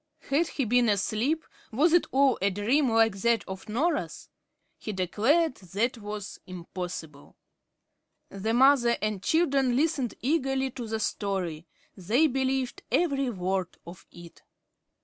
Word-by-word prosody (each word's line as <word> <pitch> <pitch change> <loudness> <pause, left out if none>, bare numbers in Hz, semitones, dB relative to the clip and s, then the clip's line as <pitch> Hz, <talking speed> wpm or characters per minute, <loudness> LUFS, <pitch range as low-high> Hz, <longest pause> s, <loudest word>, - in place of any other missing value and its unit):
Had 310 +4 +3
he 270 - -2
been 240 +1 +3
asleep? 220 +10 0 0.3
was 305 +9 +3
it 350 - +4
all 270 -1 +3
a 200 - +3
dream, 235 +9 +1
like 225 -2 +3
that 230 +2 +1
of 190 +2 -8
Norah's? 295 +11 -2 0.5
He 215 - -5
declared 230 - +1
that 210 +7 -2
was 205 -1 -7
impossible. 175 -4 -8 0.9
The 215 +4 -2
mother 250 -2 +5
and 210 -2 -2
children 275 - +2
listened 280 -4 0
eagerly 270 -2 0
to 240 -2 -7
the 220 0 -3
story. 185 -7 -3 0.3
They 220 - +2
believed 265 -2 -1
every 275 -6 +1
word 185 -3 -3
of 170 +1 -12
it. 170 -1 -14
230 Hz, 130 wpm, -27 LUFS, 195-270 Hz, 0.9 s, mother